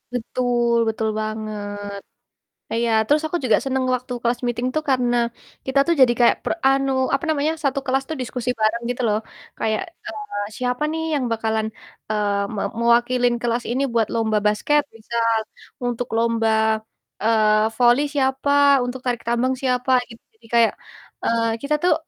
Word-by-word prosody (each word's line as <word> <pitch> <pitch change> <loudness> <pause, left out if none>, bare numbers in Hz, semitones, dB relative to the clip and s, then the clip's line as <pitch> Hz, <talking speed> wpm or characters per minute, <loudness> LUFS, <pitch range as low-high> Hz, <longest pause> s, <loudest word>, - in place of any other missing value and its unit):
Betul 240 0 0
betul 220 0 -2
banget. 215 -1 -4 1.0
E - - -2
iya. 235 -1 +1
Terus 295 +4 +3
aku 350 - -1
juga 225 - +4
seneng 265 -1 0
waktu 250 0 -6
class 240 0 0
meeting 240 +1 -1
tuh 310 - 0
karena 245 -2 +2 0.5
kita 265 +1 +1
tuh 340 - +4
jadi 240 -2 +6
kayak 240 - +5
pre - - 0
anu, 270 0 +2 0.2
apa 275 - -4
namanya, 310 +1 +1
1 275 0 +1
kelas 270 +1 +1
tuh 315 - -2
diskusi 250 0 -4
bareng 220 +2 +1
gitu 245 +1 -2
loh. 210 0 +2 0.4
Kayak, 220 -1 0 0.3
eee, 420 - -6 0.2
"Siapa 250 +3 -1
nih 320 0 -2
yang 280 -3 0
bakalan," 220 -1 0 0.4
eee, 205 -1 0
"me - - -2 0.2
mewakilin 240 +1 +3
kelas 240 0 0
ini 260 +3 0
buat 225 -2 +2
lomba 220 -2 +1
basket?" 295 +8 +2
Misal, 230 0 0 0.5
"Untuk 245 0 -2
lomba," 230 -1 +1 0.7
eee, 215 -1 +3
"voli 245 +2 +5
siapa? 265 +1 +1 0.3
Untuk 250 +1 -4
tarik 240 -2 -1
tambang 240 +2 +1
siapa?" 250 0 0 0.2
Gitu, 230 - -13
jadi 225 +1 -20
kayak, 230 -1 +5 0.5
eee, 230 0 +1
kita 285 +2 0
tuh 360 - +5
240 Hz, 160 wpm, -22 LUFS, 225-260 Hz, 1.0 s, jadi